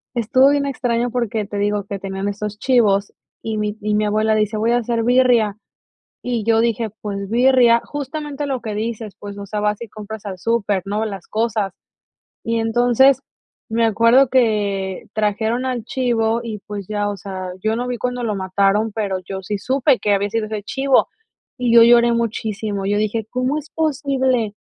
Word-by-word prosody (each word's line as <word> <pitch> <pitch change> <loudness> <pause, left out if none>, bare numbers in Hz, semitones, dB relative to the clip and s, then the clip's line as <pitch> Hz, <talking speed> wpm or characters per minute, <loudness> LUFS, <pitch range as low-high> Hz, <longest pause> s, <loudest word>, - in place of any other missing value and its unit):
estuvo 250 +4 +4
bien 285 0 +1
extraño 245 -3 -1
porque 225 -3 -1
te 205 +1 -6
digo 205 0 0
que 200 -1 -5
tenían 195 +1 -4
esos 210 +1 -5
chivos 210 -6 +2 0.3
y 220 -1 -3
mi 210 0 -2
y 210 0 -1
mi 210 0 +2
abuela 215 +1 +1
dice: 215 0 0
"Voy 225 +2 +1
a 240 - +3
hacer 235 -1 -1
birria", 240 -4 +3 0.7
Y 245 -2 -2
yo 225 0 +3
dije: 230 -1 0
"Pues 200 -1 -4
birria". 240 -1 +5
Justamente 290 0 -5
lo 265 -3 -2
que 215 -3 -4
dices 220 -1 -4
pues 200 -1 -8
o 200 - -7
sea 210 +1 -3
vas 210 0 0
y 235 - -7
compras 215 0 -9
al 190 -2 -5
súper, 205 -2 0
¿no? 210 +2 -1
Las 195 -4 -6
cosas 215 -3 -1 0.7
y 230 0 0
entonces, 245 +4 +3 0.5
me 230 +1 +2
acuerdo 230 +4 +4
que 205 -6 0
trajeron 220 +3 0
al 250 -3 -2
chivo 235 -2 0
y 220 -3 -5
pues 205 -2 -5
ya, 205 -1 -1
o 205 - -4
sea, 190 -2 -6
yo 220 +1 +1
no 245 +2 -3
vi 250 -1 -3
cuando 250 +1 -3
lo 215 -3 -1
mataron 195 +3 +1
pero 205 -3 -1
yo 190 0 -5
sí 205 +2 -3
supe 260 +5 +2
que 205 - +1
había 200 +1 0
sido 225 0 -1
ese 215 -1 -4
chivo 270 +4 +2 0.5
y 245 -2 +1
yo 230 - +9
lloré 235 0 +6
muchísimo, 215 -3 -2
yo 205 +1 +1
dije: 215 +1 -1
"¿Cómo 255 +3 0
es 305 0 -7
posible?". 265 -7 0
225 Hz, 185 wpm, -20 LUFS, 205-245 Hz, 0.7 s, yo